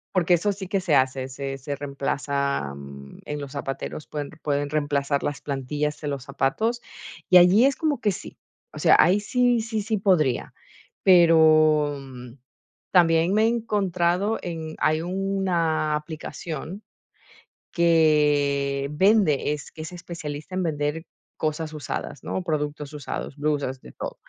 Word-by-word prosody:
Porque 175 -1 +4
eso 200 +4 0
sí 190 -2 -8
que 195 - +1
se 175 -5 +1
hace, 130 0 +1
se 135 +1 -5
se 140 +2 -5
reemplaza, 140 - -2
mm, 70 0 -11
en 150 0 -4
los 140 -2 -7
zapateros, 140 +1 -5
pueden 145 -2 -5
pueden 145 -1 -1
reemplazar 145 -1 0
las 145 - -3
plantillas 145 +2 -3
en 145 - -1
los 135 -2 -4
zapatos, 180 - -1 0.5
y 185 - +4
allí 180 +7 +7
es 275 - +3
como 305 -5 -1
que 210 -4 +1
sí. - - -9 0.3
O - - -9
sea, - - +5
ahí 185 +5 +5
sí, 245 +2 +2
sí, 220 -1 -2
sí 215 +1 -1
podría. 175 -10 +1 0.5
Pero, 155 -4 +5
mm, 125 -2 -10 0.6
también 170 0 +4
me 215 +1 +3
he - - +4
encontrado 200 -3 0
en 160 -2 -6
hay 155 +1 +2
una 180 -4 0
aplicación 160 +3 -7 0.9
que 150 -4 +2
vende, 185 -4 +3
es 150 - -8
que 155 - -8
es 160 - -7
especialista 170 -2 -7
en 185 - 0
vender 150 0 -2 0.3
cosas 155 0 -2
usadas, 145 -2 -5
¿no? - - -3
Productos 150 -3 -3
usados, 145 -1 -6
blusas, 145 -3 -1
de - - -13
todo. - - -6
155 Hz, 150 wpm, -24 LUFS, 140-185 Hz, 0.9 s, allí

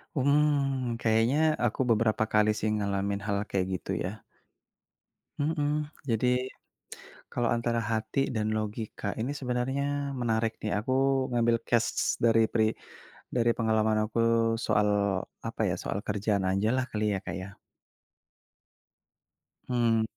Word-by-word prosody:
Mmm, 140 -3 +2
kayaknya 130 +8 +3
aku 120 +2 0
beberapa 110 -1 +3
kali 105 0 +4
sih 110 0 -1
ngalamin 100 0 -1
hal 100 -1 0
kayak 95 -2 0
gitu 95 +1 -4
ya. 100 +4 -6 1.2
Mhm, 150 0 0 0.2
jadi, 115 +2 +1 1.1
kalau 120 - +1
antara 115 0 0
hati 110 +4 -1 0.2
dan 110 0 0
logika 110 -1 -4
ini 120 +5 -1
sebenarnya 125 +2 -1 0.4
menarik 115 -1 +1
nih 110 - -2
aku 120 +5 -1 0.4
ngambil 120 -1 +3
case 115 -2 +1
dari 115 -1 +5
peri 110 -2 +3 0.7
dari 120 -1 +3
pengalaman 110 -1 +2
aku 115 - -2 0.4
soal 105 -2 +2 0.6
apa - - -4
ya, - - 0
soal 100 - -2
kerjaan 105 -1 0
ajalah 110 +7 +1
kali 105 -1 -1
ya, 95 - -1
Kak - - -4
ya. 100 +2 -9 2.1
Mmm. 115 -2 +2
115 Hz, 120 wpm, -28 LUFS, 105-125 Hz, 2.1 s, dari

